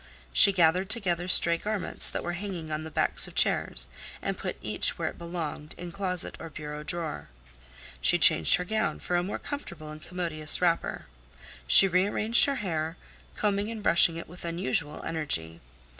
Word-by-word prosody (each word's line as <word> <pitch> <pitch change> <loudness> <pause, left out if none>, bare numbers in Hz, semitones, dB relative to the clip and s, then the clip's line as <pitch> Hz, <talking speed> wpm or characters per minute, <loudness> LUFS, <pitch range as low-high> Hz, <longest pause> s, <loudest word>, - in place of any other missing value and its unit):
She 200 - +8
gathered 180 +1 +1
together 180 -6 -2
stray 170 -2 +4
garments 210 +2 -1
that - - -5
were 175 - -4
hanging 175 -4 -7
on 155 +1 -4
the 160 - -8
backs - - +2
of - - -13
chairs, 60 +1 +1 0.3
and - - -4
put - - -6
each - - +1
where - - -2
it - - -13
belonged 165 -3 -7
in 175 0 -8
closet 180 -1 -1
or 165 - -8
bureau 150 -1 -8
drawer. 155 - -5 0.7
She - - +5
changed 80 -2 +7
her 180 - -4
gown 220 +3 -2
for 180 - -3
a 175 - +2
more 190 +3 -5
comfortable 170 - -8
and 155 0 -11
commodious 165 -3 0
wrapper. 170 -2 -1 0.6
She 195 - +8
rearranged 200 +5 +2
her 280 - -2
hair, 160 -1 -3 0.4
combing 205 0 -1
and 225 -2 -7
brushing 170 -3 +4
it 165 - -8
with 175 +2 -12
unusual 170 -2 -3
energy. 85 - -2
170 Hz, 175 wpm, -27 LUFS, 155-190 Hz, 0.7 s, She